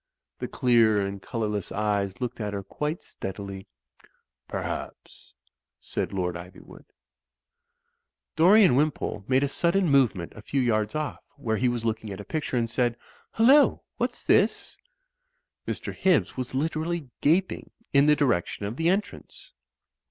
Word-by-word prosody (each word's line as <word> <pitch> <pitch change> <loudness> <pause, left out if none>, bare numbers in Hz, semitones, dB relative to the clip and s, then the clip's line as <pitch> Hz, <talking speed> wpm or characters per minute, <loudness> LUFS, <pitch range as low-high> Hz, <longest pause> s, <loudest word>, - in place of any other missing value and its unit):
The - - -3
clear 115 -4 +3
and 100 0 -3
colourless 105 -4 -3
eyes 100 -1 -1
looked 125 -1 -4
at 105 -1 -3
her 100 - -4
quite 150 - -4
steadily. 95 0 -7 0.8
"Perhaps," - - -6 0.4
said - - -3
Lord 90 -3 -1
Iv3rwood. 90 +2 -11 1.5
Dorian 185 - +6
Wimpole 145 -7 0
made 130 +1 +3
a - - +2
sudden 170 +6 +1
movement 125 - +2
a 105 - -10
few 135 +4 -1
3rards 110 +1 0
off, 155 -1 -3
where 115 -6 -2
he 125 +2 +2
was 120 -1 -3
looking 110 -1 -2
at 95 - -7
a - - -6
picture, 150 0 -2
and 115 -1 +1
said, 120 0 0 0.4
"Hullo! 265 +6 +5
What's - - -2
this?" - - +2 0.9
Mr. - - -4
Hibbs 185 -6 +2
was 130 0 -5
literally 155 0 -2
gap 180 +6 +3
ing - - -8 0.2
in 140 +1 +5
the 150 - +6
direction 120 - 0
of 110 +5 -5
the 165 +1 +2
entrance. 205 - -4
125 Hz, 145 wpm, -26 LUFS, 105-150 Hz, 1.5 s, Dorian